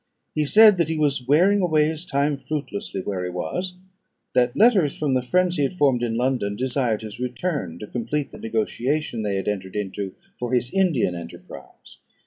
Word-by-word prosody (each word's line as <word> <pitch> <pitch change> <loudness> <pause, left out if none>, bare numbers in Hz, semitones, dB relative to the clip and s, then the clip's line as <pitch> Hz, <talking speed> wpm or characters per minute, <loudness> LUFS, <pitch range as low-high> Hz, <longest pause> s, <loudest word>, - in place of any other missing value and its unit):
He 150 - 0
said 210 +5 +7
that 170 - +2
he 160 - -1
was 140 -4 0
wearing 185 +8 +4
away 155 -4 +3
his 160 +2 -4
time 140 0 +1
fruitlessly 150 - -4
where 95 -1 -3
he 90 - -3
was; 180 - -4 0.6
that 125 -1 +2
letters 200 - +4
from 145 -3 0
the 130 - +2
friends 180 +7 +1
he - - +1
had 140 +5 0
formed 135 -6 +3
in 115 -1 -1
London 120 -5 0
desired 125 -2 -1
his 110 0 -8
return 125 - -3
to 105 - -7
complete 135 +6 -3
the - - -11
negotiation 115 +4 -1
they 105 -2 -1
had 95 - -3
entered 95 -2 -3
into 100 -1 -4 0.2
for 125 +1 -3
his 125 0 +1
Indian 170 - +2
enterprise. 85 -1 -11
130 Hz, 185 wpm, -23 LUFS, 110-155 Hz, 0.6 s, said